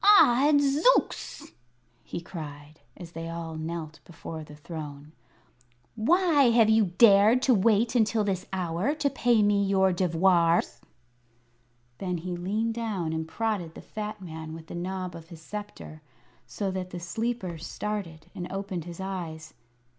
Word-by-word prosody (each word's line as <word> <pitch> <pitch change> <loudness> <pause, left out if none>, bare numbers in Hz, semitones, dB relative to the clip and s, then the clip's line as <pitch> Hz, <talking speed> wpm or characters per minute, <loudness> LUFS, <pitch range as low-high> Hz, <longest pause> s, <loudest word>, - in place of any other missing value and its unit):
"Odds 285 +2 +4
Zooks!" 410 -10 +1 0.5
he 170 - -6
cried, 150 -3 -9 0.2
as 170 -2 -10
they 165 0 -6
all 165 -1 -5
knelt 160 0 -5
before 165 -1 -8
the 150 -1 -12
throne, 150 -2 -8 0.8
"why 295 +2 +4
have 225 -2 +5
you 220 -1 +5
dared 220 +3 +6
to 260 - +5
wait 225 +2 +3
until 225 -2 +2
this 190 -3 -2
hour 185 - -1
to 290 -2 +1
pay 240 -4 +3
me 205 -1 +3
your 190 -1 +3
devoirs?" 175 -1 +2 1.2
Then 180 -2 -2
he 175 +2 -4
leaned 210 +6 -1
down 205 -8 -2
and 160 0 -3
prodded 195 -4 -2
the - - -9
fat 215 0 -6
man 160 -2 -7
with 165 -1 -10
the - - -10
knob 185 +1 -4
of 165 -1 -11
his 165 -2 -12
sceptre, 205 -6 -8 0.5
so 200 -2 -3
that 185 -1 -4
the 175 - -6
sleeper 190 -1 -3
started 170 -4 -5
and 175 - -6
opened 195 -4 -4
his 175 0 -9
eyes. 165 -5 -5
185 Hz, 145 wpm, -27 LUFS, 165-220 Hz, 1.2 s, dared